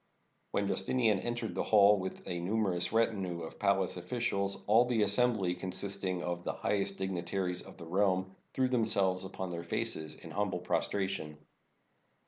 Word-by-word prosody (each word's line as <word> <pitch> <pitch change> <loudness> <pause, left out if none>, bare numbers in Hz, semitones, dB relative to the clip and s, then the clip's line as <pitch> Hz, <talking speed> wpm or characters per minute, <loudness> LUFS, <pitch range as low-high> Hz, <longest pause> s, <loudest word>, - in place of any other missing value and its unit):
When - - 0
Justinian 115 -6 +1
entered 120 0 -3
the - - -1
hall 105 -1 +6
with 95 0 -6
a 85 - -2
numerous 95 -1 +1
retinue 100 -6 0
of 80 - -9
palace 100 -2 +2
officials, 100 +1 -1
all 115 +4 +5
the 120 -3 +2
assembly, 105 -3 +3
consisting 95 0 -2
of 85 0 -3
the - - -2
highest 100 -1 -1
dignitaries 90 -1 -2
of - - -13
the 85 - -9
realm, 95 +1 +1 0.2
threw 130 -1 +3
themselves 100 -6 +1
upon 95 -1 -5
their 85 0 -4
faces 80 -2 -3
in - - -11
humble 100 -2 -1
prostration. 90 -4 -1
95 Hz, 150 wpm, -32 LUFS, 90-105 Hz, 0.2 s, hall